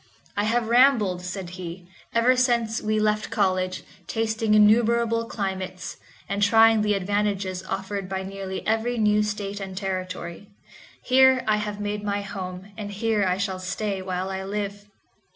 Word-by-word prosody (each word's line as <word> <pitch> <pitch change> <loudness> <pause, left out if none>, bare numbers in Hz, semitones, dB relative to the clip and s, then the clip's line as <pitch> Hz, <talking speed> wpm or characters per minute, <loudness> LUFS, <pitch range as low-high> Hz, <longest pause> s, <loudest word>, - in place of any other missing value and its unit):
"I 205 - +1
have 230 +1 +1
rambled," 230 -7 +4
said 180 -1 -6
he, 180 -1 -8 0.2
"ever 240 +2 +4
since 235 -3 +1
we 215 0 0
left 215 0 +1
college, 185 -2 0 0.2
tasting 220 -1 +1
innumerable 230 +2 +4
climates, 190 -4 -4 0.3
and 200 +1 -2
trying 225 +1 +6
the 210 -1 +2
advantages 195 -1 -1
offered 195 0 -4
by 190 0 -3
nearly 195 0 -6
every 225 +2 0
new 210 -1 +3
State 210 -1 -3
and 190 -1 -7
Territory. 185 -1 -4 0.6
Here 260 0 +5
I 215 -1 +3
have 210 -1 -4
made 205 0 -3
my 205 0 -1
home, 190 -1 -7
and 205 -1 -5
here 215 0 0
I 180 0 +1
shall 195 -1 -2
stay 195 +2 -3
while 185 0 -3
I 190 0 -4
live. 205 +1 -4
205 Hz, 150 wpm, -25 LUFS, 190-220 Hz, 0.6 s, trying